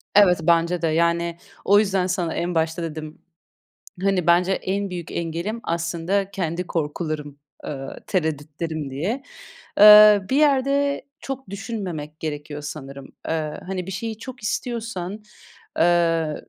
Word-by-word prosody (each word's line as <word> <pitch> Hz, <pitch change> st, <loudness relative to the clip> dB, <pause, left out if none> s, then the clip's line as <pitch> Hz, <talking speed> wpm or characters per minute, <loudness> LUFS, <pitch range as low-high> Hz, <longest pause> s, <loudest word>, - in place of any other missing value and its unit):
Evet, 190 Hz, -4 st, +7 dB
bence 170 Hz, +1 st, +2 dB
de. 165 Hz, -, +1 dB
Yani, 170 Hz, +1 st, +1 dB, 0.3 s
o 205 Hz, +1 st, +6 dB
yüzden 195 Hz, -3 st, +1 dB
sana 175 Hz, -3 st, -1 dB
en 175 Hz, 0 st, -2 dB
başta 160 Hz, +1 st, 0 dB
dedim, 155 Hz, -1 st, -7 dB, 0.8 s
hani, 190 Hz, -3 st, +1 dB
bence 175 Hz, +2 st, +4 dB
en 195 Hz, +1 st, -1 dB
büyük 175 Hz, -3 st, -6 dB
engelim 170 Hz, +7 st, -3 dB
aslında 170 Hz, +4 st, -1 dB
kendi 180 Hz, -3 st, -2 dB
korkularım, 150 Hz, -2 st, -3 dB, 0.3 s
eee, 135 Hz, -2 st, -5 dB, 0.2 s
tereddütlerim 155 Hz, -2 st, -2 dB
diye. 185 Hz, -, -3 dB, 0.6 s
Eee, 210 Hz, 0 st, +10 dB
bir 265 Hz, -, +2 dB
yerde 280 Hz, -1 st, +2 dB, 0.2 s
çok 265 Hz, -, -6 dB
düşünmemek 190 Hz, -8 st, -5 dB
gerekiyor 150 Hz, -1 st, -5 dB
sanırım. 140 Hz, -2 st, -8 dB, 0.2 s
Eee, 155 Hz, -2 st, -1 dB
hani, 185 Hz, -2 st, -4 dB
bir -, -, -5 dB
şeyi 220 Hz, +3 st, -4 dB
çok 250 Hz, -1 st, -10 dB
istiyorsan, 215 Hz, -4 st, -3 dB, 0.6 s
eee, 165 Hz, -2 st, +3 dB
175 Hz, 125 wpm, -23 LUFS, 160-200 Hz, 0.8 s, Eee